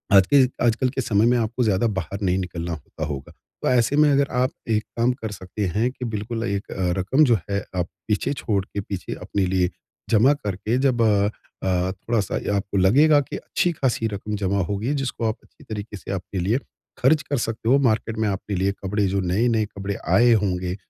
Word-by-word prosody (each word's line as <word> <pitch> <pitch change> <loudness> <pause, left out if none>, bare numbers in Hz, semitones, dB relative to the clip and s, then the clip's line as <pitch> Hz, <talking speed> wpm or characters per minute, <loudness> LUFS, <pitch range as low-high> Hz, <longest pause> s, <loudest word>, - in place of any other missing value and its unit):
आज 95 -1 +7
के 135 -2 +7 0.2
आजकल 120 +2 +2
के 135 +1 -2
समय 110 -3 +2
में 120 +1 +4
आपको 115 +2 0
ज़्यादा 110 +1 +2
बाहर 95 +5 -6
नहीं 95 -1 +1
निकलना 85 -2 -4
होता 80 +1 -6
होगा, 70 -3 -6 0.3
तो - - -1
ऐसे 125 +2 +3
में 150 -1 +5
अगर 140 0 +3
आप 130 - +2 0.2
एक 110 -1 +2
काम 120 +2 +3
कर 115 -4 -6
सकते 95 +1 -4
हैं 115 +4 +2
कि 125 -1 -6
बिल्कुल 115 +2 -3
एक 100 0 -1 0.3
रक़म 130 +12 +3
जो 120 -4 +4
है 100 0 0 0.2
आप 90 -1 0 0.2
पीछे 105 +6 0
छोड़ 105 -7 -1
के 100 - -5
पीछे 95 -2 -5
अपने 100 -2 -2
लिए 90 -1 +1 0.4
जमा 120 +6 +5
करके 105 -1 -2
जब 120 -3 +2
अ 105 -2 +3 0.4
अ, 90 0 +1
थोड़ा-सा 100 +2 -2 0.2
आपको 100 0 -2
लगेगा 145 +11 +5
की - - -6
अच्छी-ख़ासी 135 -9 0
रक़म 105 0 -4
जमा 100 0 0
हो 100 - 0
गई 110 +5 -4
है 145 - +1
जिसको 125 -3 -3
आप 110 - 0
अच्छी - - -21
तरीक़े 105 -1 -6
से 95 - -8
आपके 95 0 -4
लिए 100 +8 +1 0.4
ख़र्च 150 +4 +4
कर 145 - -2
सकते 115 0 -3
हो 135 - +6
मार्केट 115 -3 +1
में - - +1
आपके 100 +1 -3
लिए 95 +2 +1
कपड़े 105 +1 0
जो 100 +1 0
नए-नए 110 +5 +1
कपड़े 100 -1 -5 0.2
आए 120 +3 +6
होंगे 90 -2 -1
105 Hz, 205 wpm, -23 LUFS, 95-120 Hz, 0.4 s, आज